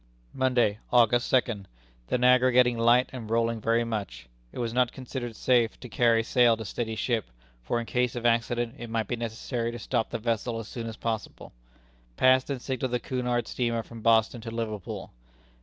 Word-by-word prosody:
"Monday, 125 -5 +1
August 120 0 +4
second. 115 -6 0 0.4
The - - +1
Niagara 125 +1 +5
getting 125 -1 +4
light, 120 +2 +3
and 115 -4 -7
rolling 115 0 0
very 115 +2 +2
much; 100 - -5 0.2
it - - -12
was 115 -2 -2
not 125 0 +2
considered 125 -3 -6
safe 120 -2 +2
to 125 - -9
carry 115 -1 +3
sail 120 -1 +4
to 110 - -6
steady 110 +2 -3
ship, 115 -1 -1 0.4
for 60 - -1
in 120 - -4
case 125 0 0
of 120 0 -5
accident 120 0 +1
it 120 - -7
might 115 -2 -1
be - - -1
necessary 115 +1 -3
to 120 - -6
stop 110 0 -1
the 115 - -3
vessel 115 0 -2
as 115 -2 -6
soon 115 -2 -6
as 115 0 -7
possible. 110 -2 -5 0.6
Passed 130 +1 +4
and 140 -2 -2
signalled 130 0 -3
the 125 - +1
Cunard 125 -2 -2
steamer 115 -2 -1
from 115 0 -11
Boston 115 +1 +3
to 115 - -6
Liverpool." 110 -4 -5
115 Hz, 190 wpm, -27 LUFS, 115-125 Hz, 0.6 s, Niagara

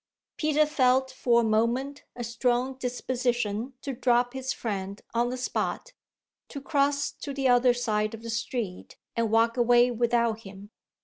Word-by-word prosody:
Peter 305 -1 +2
felt 265 -3 +2
for 240 -2 +2
a - - -1
moment 235 +6 0
a 245 - -5
strong 245 +2 0
disposition 245 -2 -2
to 275 - -3
drop 245 0 +2
his 265 0 -3
friend 200 -3 -4
on 240 +1 +1
the 255 - -4
spot, 470 - -3 0.5
to 280 - -7
cross 280 0 +1
to 280 -2 -7
the 270 -1 +1
other 245 0 +4
side 215 -2 -1
of 225 - -13
the 230 - -6
street 230 -4 -4 0.2
and 230 -1 0
walk 230 +2 +2
away 240 0 +5
without 235 -1 +1
him. 200 0 -12
245 Hz, 160 wpm, -27 LUFS, 230-260 Hz, 0.5 s, away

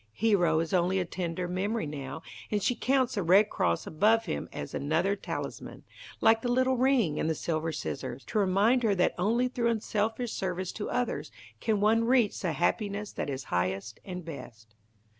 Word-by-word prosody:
Hero 175 - +3
is 165 - -4
only 185 +1 +2
a 180 - 0
tender 175 0 -3
memory 195 +3 -1
now, 145 +1 -6 0.3
and 205 -2 -1
she - - +2
counts 260 0 +1
the 205 - -1
Red 190 +5 +5
Cross 85 -1 0
above 220 +7 +3
him 160 - -4
as - - -6
another 165 +8 +1
talisman, 195 - -6 0.4
like 225 0 +5
the 245 - -1
little 255 +1 +3
ring 245 - +2
and 160 - 0
the 160 - 0
silver 160 +1 -2
scissors, 135 -3 -5
to 220 - -1
remind 205 +6 +3
her 215 -4 +2
that 180 - +2
only 230 +7 +2
through 240 -2 0
unselfish 225 +1 -1
service 185 -1 -3
to 210 - -5
others 245 -1 -2 0.3
can 215 -3 0
one 225 +2 +3
reach 240 -4 +3
the 175 -4 -1
happiness 205 - -1
that - - -4
is 135 -1 -4
highest 95 +5 -1
and 180 -3 -7
best. 120 -8 -10
195 Hz, 180 wpm, -29 LUFS, 160-225 Hz, 0.4 s, Red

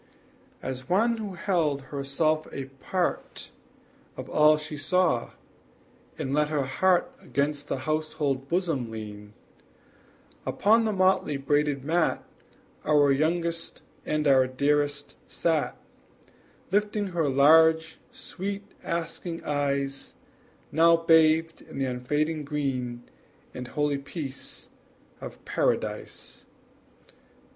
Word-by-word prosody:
As 130 -1 -5
one 225 +6 +3
who 205 -4 -5
held 165 -6 0
herself 155 +3 0
a 135 - -5 0.2
part 185 -2 -2 0.7
Of - - -7
all 150 0 +6
she 150 0 -6
saw, 160 -4 +1 0.8
and 135 - -3
let 150 +1 +2
her 150 -2 0
heart 185 - +2
Against 145 +1 -2
the 130 - -3
household 150 -3 -1
bosom 165 -9 0
lean, 105 -1 -8 1.1
Upon 225 +3 +3
the 220 - +1
motley 185 -6 +2
braided 145 0 +1
mat 165 +2 +1 0.6
Our 145 -2 +4
youngest 165 +3 0 0.2
and 155 0 0
our 130 -2 +5
dearest 145 +2 0
sat, 160 -3 0 0.9
Lifting 205 0 +1
her 165 -5 0
large, 160 +4 +5
sweet, 200 +2 -5 0.2
asking 170 0 -4
eyes, 140 -1 -2 0.6
Now 165 +2 +6
bathed 165 0 +4
in - - -11
the 135 - 0
unfading 150 +5 -1
green 130 -5 -3 0.5
And 125 0 -6
holy 145 0 0
peace 140 -1 -6 0.5
of - - -9
Paradise. - - -2
150 Hz, 105 wpm, -27 LUFS, 140-170 Hz, 1.1 s, all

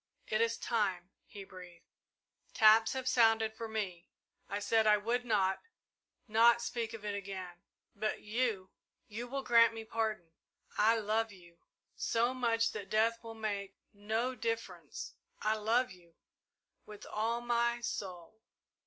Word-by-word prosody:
"It 215 +1 0
is 230 0 +1
time," 190 -5 -1 0.2
he 200 -2 -9
breathed. 180 -3 -13 0.7
"Taps 220 +1 +6
have 260 -1 -4
sounded 225 -2 +4
for 225 +1 -6
me. 195 -6 -4 0.4
I 200 - -2
said 220 +1 +2
I 210 0 +6
would 235 +4 -1
not 195 -4 +1 0.7
not 230 +2 +5
speak 230 -1 -3
of 210 -2 -10
it 205 - -2
again 185 -3 -6 0.3
but 215 +1 -2
you 215 -4 -1 0.4
you 230 +3 -6
will 270 +2 -4
grant 230 -2 +5
me 225 0 -7
pardon 220 -7 -2 0.4
I 225 +2 +4
love 220 +1 0
you 170 -3 -17 0.4
so 235 +2 +1
much 230 -3 +1
that 205 -2 -7
death 230 +2 +2
will 225 0 -8
make 205 -3 -4 0.2
no 220 +5 -1
difference 230 -1 -4 0.3
I 215 +1 +2
love 225 +2 +1
you 170 -2 -17 0.7
with 210 -1 -10
all 225 +2 -1
my 235 0 +1
soul!" 190 -2 -6
220 Hz, 145 wpm, -33 LUFS, 200-230 Hz, 0.7 s, Taps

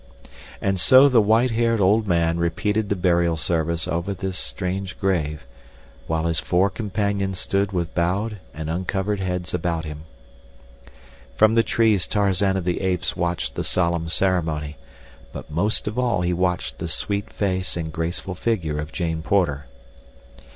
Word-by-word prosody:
'" - - -18
And 95 -1 0
so 130 +8 +7
the 125 -5 +5
white 110 +4 +3
haired 115 0 +1
old 105 +3 +3
man 85 -2 +1
repeated 100 +5 0
the 100 - +1
burial 85 -2 +2
service 80 +1 0
over 85 +4 -2
this 95 0 -4
strange 95 0 -3
grave, 75 -7 -1 0.6
while 80 0 -1
his 85 -2 +1
four 95 +2 +1
companions 100 -1 -2
stood 100 +1 0
with 85 -4 -2
bowed 100 +5 -1
and 80 0 -6
uncovered 95 +4 -2
heads 90 -1 -3
about 85 -2 -1
him. 75 0 -8 1.3
From 110 +1 +5
the 115 - +5
trees 110 -5 +2
Tarzan 100 -1 +2
of 90 - -4
the 90 -1 -1
Apes 90 -3 -1
watched 85 0 -2
the - - -3
solemn 85 -2 0
ceremony; 80 -4 +1 0.6
but - - -9
most 100 +9 0
of 110 +4 -2
all 120 -7 +1
he 90 0 0
watched 90 0 -1
the - - -3
sweet 100 0 -2
face 95 -3 -2
and 80 -2 -4
graceful 85 +3 -3
figure 85 -7 -1
of 75 0 -5
Jane 80 -3 -2
Porter. 80 -7 0
90 Hz, 160 wpm, -23 LUFS, 85-100 Hz, 1.3 s, so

